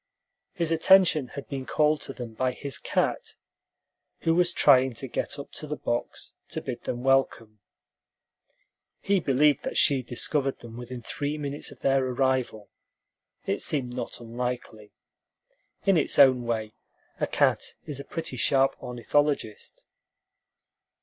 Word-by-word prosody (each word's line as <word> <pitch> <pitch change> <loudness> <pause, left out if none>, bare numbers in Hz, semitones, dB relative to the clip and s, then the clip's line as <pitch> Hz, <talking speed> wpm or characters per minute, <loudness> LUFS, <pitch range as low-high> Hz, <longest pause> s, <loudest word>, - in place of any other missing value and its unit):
His 170 -4 -1
attention 165 -4 +5
had 140 - -6
been 135 -2 -5
called 150 0 +2
to 135 - -5
them 120 -4 -8
by 125 +3 -1
his 140 +1 -5
cat, - - -1 0.9
who 165 - +2
was 175 +1 +3
trying 130 -6 +5
to 135 - -4
get 130 - -3
up 140 - -8
to 155 - -6
the 150 - -3
box 120 0 -4 0.2
to - - -3
bid - - -6
them 120 0 -3
welcome. 120 -5 +1 1.4
He 200 -1 +1
believed 145 -1 +3
that - - -4
she 140 -2 +4
discovered 135 +3 -1
them 115 -1 -11
within 120 0 -8
three 145 +5 -3
minutes 145 -1 -4
of - - -15
their 135 -1 +2
arrival. 130 -4 -1 0.7
It - - -1
seemed 125 -5 -2
not 125 - -5
unlikely. 120 -2 -5 0.9
In 195 -3 +4
its 155 - +1
own 130 -3 +6
way 110 -2 -2 0.5
a - - 0
cat - - +1
is 145 -2 -4
a - - -6
pretty 160 -3 -5
sharp 135 +2 +2
ornithologist. 125 -1 -2
135 Hz, 145 wpm, -27 LUFS, 120-150 Hz, 1.4 s, own